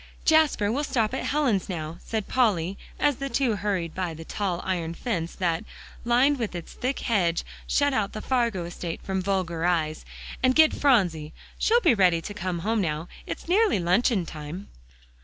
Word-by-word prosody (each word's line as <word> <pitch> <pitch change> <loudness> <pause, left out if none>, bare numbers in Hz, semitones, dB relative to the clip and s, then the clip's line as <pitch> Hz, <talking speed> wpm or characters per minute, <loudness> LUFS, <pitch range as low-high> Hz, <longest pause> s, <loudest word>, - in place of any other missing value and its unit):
"Jasper, 310 -10 +4
we'll 280 +5 -1
stop 230 -5 0
at 265 - -2
Helen's 265 -11 +1
now," 160 -2 -5
said 220 -3 -3
Polly 200 -8 +1 0.2
as 290 -4 +2
the 275 0 -4
two 240 -4 +1
hurried 190 -5 -2
by 180 -3 -3
the 165 +1 -9
tall 190 -3 -2
iron 170 -3 -2
fence, 170 -6 -3
that, 170 0 0 0.4
lined 255 +4 +3
with 220 -6 -3
its 170 - -7
thick 260 +2 -2
hedge, 180 -8 +1 0.2
shut 285 -1 +2
out 215 -6 0
the 215 - -4
Fargo 235 -9 0
estate 170 -1 -5
from 190 -1 -2
vulgar 180 -4 -1
eyes, 160 -3 0 0.4
"and 255 0 +3
get 315 -1 +6
Phronsie; 175 - +2 0.3
she'll 470 +2 +4
be 335 - +5
ready 180 -5 +4
to 205 - -7
come 185 -3 -3
home 220 0 +1
now; 160 -1 -2 0.2
it's - - -6
nearly 410 - +3
luncheon 185 +2 +2
time." 160 +6 -8
200 Hz, 175 wpm, -26 LUFS, 170-250 Hz, 0.4 s, get